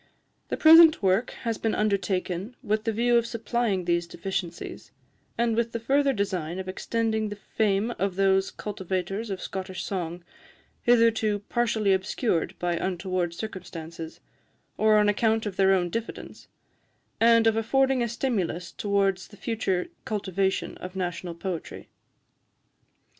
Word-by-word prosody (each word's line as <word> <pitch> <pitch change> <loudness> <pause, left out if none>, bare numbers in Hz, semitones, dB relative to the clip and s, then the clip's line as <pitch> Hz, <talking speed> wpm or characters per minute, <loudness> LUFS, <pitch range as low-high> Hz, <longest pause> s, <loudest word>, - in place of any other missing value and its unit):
The - - -2
present 320 -4 +8
work 195 +5 +2
has 230 -2 -2
been 225 - 0
undertaken 195 0 -1
with 215 +1 -1
the 225 - +1
view 240 +2 +3
of 235 0 +1
supplying 230 -4 -1
these 170 0 +1
deficiencies, 175 -2 -5 0.5
and 230 -1 +1
with 235 0 0
the 230 - -2
further 275 +4 +2
design 185 -7 -2
of 190 0 -5
extending 220 +2 -1
the 205 - -5
fame 205 +1 0
of 195 -1 0
those 195 0 +3
cultivators 195 +1 -4
of 190 -2 -3
Scottish 190 -1 -5
song 175 -2 -4 0.6
hitherto 225 -3 +3
partially 230 -4 +2
obscured 190 - -1
by 175 -1 -1
untoward 180 -1 -2
circumstances, 170 -5 -7 0.6
or 215 0 +4
on 210 0 +4
account 220 +1 +2
of 205 -3 -4
their 190 0 +4
own 180 -2 +2
diffidence 230 +3 -6 0.7
and 230 0 +5
of 225 -1 +4
affording 265 +3 +2
a 235 - 0
stimulus 200 -8 -2
towards 195 -2 0
the 205 - -16
future 195 -6 -1
cultivation 195 -2 -1
of 185 +1 -8
national 175 -2 -3
poetry. 175 -1 -6
200 Hz, 135 wpm, -26 LUFS, 185-225 Hz, 0.7 s, present